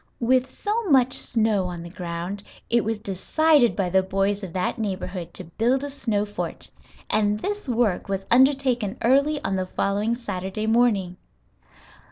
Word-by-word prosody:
With 255 Hz, +2 st, +2 dB
so 430 Hz, -, -2 dB
much 260 Hz, -2 st, +4 dB
snow 220 Hz, -7 st, +1 dB
on 175 Hz, -1 st, -6 dB
the 170 Hz, -, -8 dB
ground 175 Hz, +2 st, -5 dB, 0.3 s
it 235 Hz, 0 st, +3 dB
was 225 Hz, 0 st, -1 dB
decided 240 Hz, -, +2 dB
by 185 Hz, -3 st, -1 dB
the 190 Hz, +1 st, +4 dB
boys 195 Hz, +2 st, -1 dB
of 185 Hz, -, -6 dB
that 185 Hz, +4 st, -2 dB
neighborhood 185 Hz, -4 st, -4 dB
to -, -, -4 dB
build 235 Hz, -, 0 dB
a 285 Hz, -, -4 dB
snow 220 Hz, -7 st, -1 dB
fort, 205 Hz, -, -5 dB, 0.4 s
and 210 Hz, -1 st, +1 dB
this 410 Hz, -, -4 dB
work 225 Hz, -6 st, 0 dB
was 195 Hz, 0 st, -2 dB
undertaken 255 Hz, -4 st, +3 dB
early 280 Hz, +5 st, +3 dB
on 195 Hz, 0 st, -1 dB
the 185 Hz, 0 st, -2 dB
following 205 Hz, +5 st, 0 dB
Saturday 205 Hz, -3 st, -4 dB
morning. 220 Hz, -6 st, +2 dB
215 Hz, 160 wpm, -24 LUFS, 190-250 Hz, 0.4 s, much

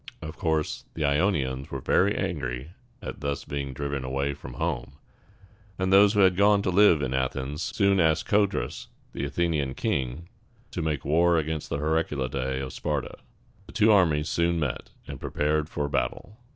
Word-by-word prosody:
Of 80 Hz, 0 st, -7 dB
course, 80 Hz, -4 st, -1 dB
the 75 Hz, -, -1 dB
Ionians 70 Hz, -4 st, 0 dB
were -, -, -4 dB
very -, -, +2 dB
angry 60 Hz, +5 st, -3 dB, 0.3 s
at -, -, -6 dB
thus 70 Hz, -1 st, -3 dB
being 70 Hz, -1 st, -4 dB
driven 70 Hz, 0 st, -3 dB
away 70 Hz, +2 st, -1 dB
from 70 Hz, -, -10 dB
home; 65 Hz, -, -3 dB, 0.8 s
and 95 Hz, 0 st, 0 dB
those 100 Hz, +1 st, +7 dB
who 105 Hz, -, +3 dB
had 95 Hz, -2 st, +5 dB
gone 100 Hz, +1 st, +4 dB
to 95 Hz, -, 0 dB
live 90 Hz, -5 st, +5 dB
in 65 Hz, 0 st, -2 dB
Athens 65 Hz, +3 st, -2 dB
soon 100 Hz, -1 st, +2 dB
asked 80 Hz, -2 st, +2 dB
Co´drus, 100 Hz, -, 0 dB, 0.3 s
the 70 Hz, -, -3 dB
Athenian 75 Hz, -2 st, -1 dB
king, 65 Hz, +6 st, -2 dB, 0.4 s
to -, -, -3 dB
make 75 Hz, -3 st, -2 dB
war 85 Hz, +3 st, +3 dB
against 80 Hz, -1 st, -2 dB
the -, -, -1 dB
Heraclidæ 70 Hz, -4 st, -1 dB
of 65 Hz, -, -6 dB
Sparta. 75 Hz, -3 st, -3 dB, 0.5 s
The -, -, -13 dB
two 110 Hz, +1 st, +4 dB
armies 80 Hz, -7 st, +3 dB
soon 85 Hz, 0 st, +1 dB
met, 70 Hz, -5 st, -3 dB, 0.2 s
and -, -, -8 dB
prepared 75 Hz, +1 st, 0 dB
for 75 Hz, -1 st, -2 dB
battle. 105 Hz, +7 st, -2 dB
75 Hz, 165 wpm, -26 LUFS, 70-85 Hz, 0.8 s, those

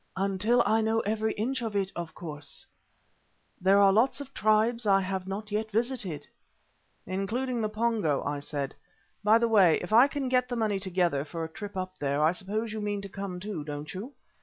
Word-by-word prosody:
"Until 200 Hz, +5 st, +2 dB
I 220 Hz, +1 st, +3 dB
know 220 Hz, +1 st, +1 dB
every 220 Hz, +1 st, -1 dB
inch 255 Hz, +5 st, -2 dB
of 225 Hz, -3 st, -3 dB
it, 195 Hz, -1 st, 0 dB
of 170 Hz, -2 st, -6 dB
course. 150 Hz, -4 st, -6 dB, 1.0 s
There 190 Hz, +2 st, +5 dB
are 195 Hz, -1 st, +6 dB
lots 235 Hz, +8 st, +3 dB
of 275 Hz, -1 st, -8 dB
tribes 215 Hz, +2 st, +2 dB
I 195 Hz, -1 st, +5 dB
have 190 Hz, -1 st, -3 dB
not 205 Hz, +2 st, -5 dB
yet 215 Hz, +1 st, -1 dB
visited." 215 Hz, -, -1 dB, 0.8 s
"Including 230 Hz, +7 st, -2 dB
the 215 Hz, -, 0 dB
Pongo," 215 Hz, -9 st, 0 dB
I 145 Hz, 0 st, -2 dB
said. 140 Hz, -1 st, -4 dB, 0.5 s
"By 215 Hz, +2 st, +6 dB
the 235 Hz, 0 st, +2 dB
way, 195 Hz, -7 st, +5 dB
if 180 Hz, +4 st, -5 dB
I 240 Hz, +5 st, +8 dB
can 285 Hz, -2 st, -3 dB
get 250 Hz, 0 st, +2 dB
the 245 Hz, -, -2 dB
money 215 Hz, -4 st, 0 dB
together 180 Hz, -6 st, 0 dB
for 165 Hz, +2 st, -5 dB
a -, -, -3 dB
trip 205 Hz, -2 st, -7 dB
up 185 Hz, 0 st, -5 dB
there, 140 Hz, 0 st, 0 dB
I 155 Hz, -, +5 dB
suppose 210 Hz, +5 st, -3 dB
you 215 Hz, -, -4 dB
mean 205 Hz, -1 st, -2 dB
to 200 Hz, -, -7 dB
come 195 Hz, -2 st, -5 dB
too, 190 Hz, -5 st, -5 dB
don't 150 Hz, 0 st, -6 dB
you? 215 Hz, +9 st, -7 dB
205 Hz, 200 wpm, -28 LUFS, 185-225 Hz, 1.0 s, I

